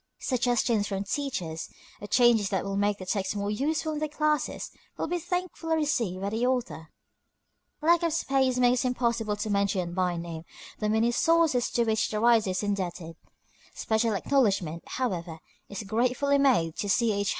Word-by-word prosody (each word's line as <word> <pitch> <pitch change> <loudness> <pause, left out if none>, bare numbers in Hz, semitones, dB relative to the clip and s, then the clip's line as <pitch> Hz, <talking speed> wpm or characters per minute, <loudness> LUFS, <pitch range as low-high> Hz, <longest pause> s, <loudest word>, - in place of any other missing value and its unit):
Suggestions, 240 -4 +1
from 195 -1 -2
teachers, 195 - -3 0.3
of 205 - -8
changes 235 -5 +4
that 190 -1 -1
will 195 0 -3
make 205 0 +1
the 185 - -8
text 195 +1 -1
more 200 0 -2
useful 305 +7 -1
in 300 - -3
their 310 - -1
classes, 300 0 -1 0.3
will - - -1
be 350 +2 -2
thankfully 355 -2 -2
received 240 - -1
by 200 - -2
the 225 +2 -1
author. 245 -10 -1 0.9
Lack 340 +1 +4
of 335 -1 +1
space 270 -5 +1
makes 250 0 +3
it - - +1
impossible 235 -4 0
to 210 +1 -3
mention 200 -3 0
by 180 -1 0
name 170 -1 -6 0.4
the 215 - 0
many 220 +2 +2
sources 325 -3 +2
to 235 - +1
which 220 -2 +1
the 215 - -2
writer 230 -3 +4
is 185 +2 -1
indebted. 180 -5 -3 0.6
Special 220 -1 0
acknowledgment, 195 - +1
however, 180 -10 -3 0.3
is 200 +1 -5
gratefully 250 +7 +1
made 225 - +3
to 205 - -3
C. 230 +3 +3
H. 200 0 -1
225 Hz, 170 wpm, -27 LUFS, 195-260 Hz, 0.9 s, changes